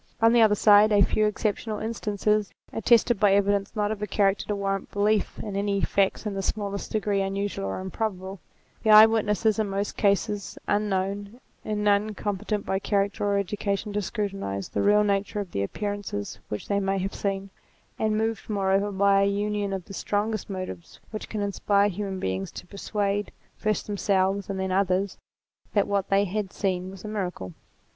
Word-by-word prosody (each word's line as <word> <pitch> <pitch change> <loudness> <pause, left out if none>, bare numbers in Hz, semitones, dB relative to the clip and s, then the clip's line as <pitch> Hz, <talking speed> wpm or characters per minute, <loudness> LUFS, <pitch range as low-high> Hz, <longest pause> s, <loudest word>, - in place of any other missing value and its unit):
On 225 +1 +5
the 240 - +6
other 215 -2 +5
side, 210 +1 +6
a 205 -1 +6
few 215 +3 +2
exceptional 210 +1 -2
instances, 210 -2 0 0.2
attested 230 0 +3
by 200 -1 +5
evidence 200 +1 +1
not 210 -1 0
of 215 -1 -4
a 210 - -2
character 195 0 +1
to 210 - -1
warrant 195 -1 -2
belief 210 +1 +1
in 205 -3 -5
any 200 0 0
facts 195 +2 +1
in 210 - -2
the 195 - -2
smallest 200 0 -3
degree 205 -2 0
unusual 195 - -2
or 95 - -3
improbable; 190 0 -4 0.4
the 220 - 0
eye 215 0 +11
witnesses 220 0 +1
in 215 -2 0
most 200 +1 -3
cases 200 0 0
unknown, 205 +2 -1 0.2
in 210 -1 -2
none 205 +1 +2
competent 205 +1 -2
by 190 - 0
character 200 0 0
or 200 -1 +2
education 200 +1 -2
to 210 - 0
scrutinize 195 - -3
the - - -1
real 210 +1 +5
nature 200 0 0
of 200 -3 -5
the 100 - -2
appearances 205 - -4
which 105 - -5
they 200 0 +1
may 195 0 0
have 195 +1 -2
seen,* 195 -1 -3 0.5
and 215 -1 +1
moved 225 0 -2
moreover 200 0 +1
by 200 0 +4
a 200 - +3
union 205 0 -1
of 190 -3 -4
the - - -10
strongest 210 +2 -2
motives 185 -3 -7
which 215 - -6
can 215 - -3
inspire 200 0 +2
human 195 0 -4
beings 95 - -2
to - - -9
persuade, 200 +1 -2 0.2
first 215 -1 -1
themselves, 195 -1 0
and 195 -1 -3
then 190 0 -1
others, 190 0 +1 0.6
that 205 - +3
what 200 -1 0
they 195 0 +4
had 200 0 -3
seen 185 -2 -2
was 190 +1 -10
a - - -4
miracle. 180 - -4
200 Hz, 180 wpm, -26 LUFS, 195-210 Hz, 0.6 s, eye